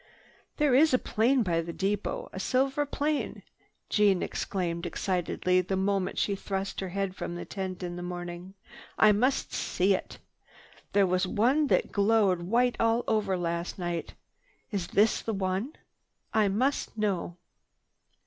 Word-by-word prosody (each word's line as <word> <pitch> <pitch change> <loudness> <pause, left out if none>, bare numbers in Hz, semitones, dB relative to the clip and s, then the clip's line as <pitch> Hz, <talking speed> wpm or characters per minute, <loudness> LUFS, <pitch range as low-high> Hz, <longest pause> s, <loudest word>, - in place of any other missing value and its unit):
"There 295 -4 +3
is 285 +1 +5
a - - +5
plane 245 +2 +2
by 170 -4 +1
the 170 +1 -6
depot, 200 +3 -2
a - - -5
silver 270 +6 +1
plane!" 295 +1 -2 0.4
Jeanne 200 -3 +3
exclaimed 175 -3 -2
excitedly 180 0 0
the 185 +2 -2
moment 195 0 0
she 200 - +1
thrust 195 0 -4
her 190 - -3
head 195 0 -2
from 175 - -5
the 175 - -6
tent 190 -2 -5
next 175 0 -4
morning. 175 +1 -6 0.4
"I 215 - +7
must 250 +7 +1
see 190 +2 +1
it. 185 - -4 0.8
There 200 -1 +5
was 185 +1 +1
one 260 +10 +2
that - - +1
glowed 200 -3 +3
white 240 +7 +1
all 230 +1 +2
over 205 -4 +1
last 170 0 -3
night. 175 -2 -4 0.6
Is 195 -5 -2
this 210 +4 +3
the 225 - -3
one? 195 +8 -2 0.6
I 215 -2 +4
must 235 +5 0
know." 190 -5 -1
195 Hz, 150 wpm, -28 LUFS, 180-225 Hz, 0.8 s, I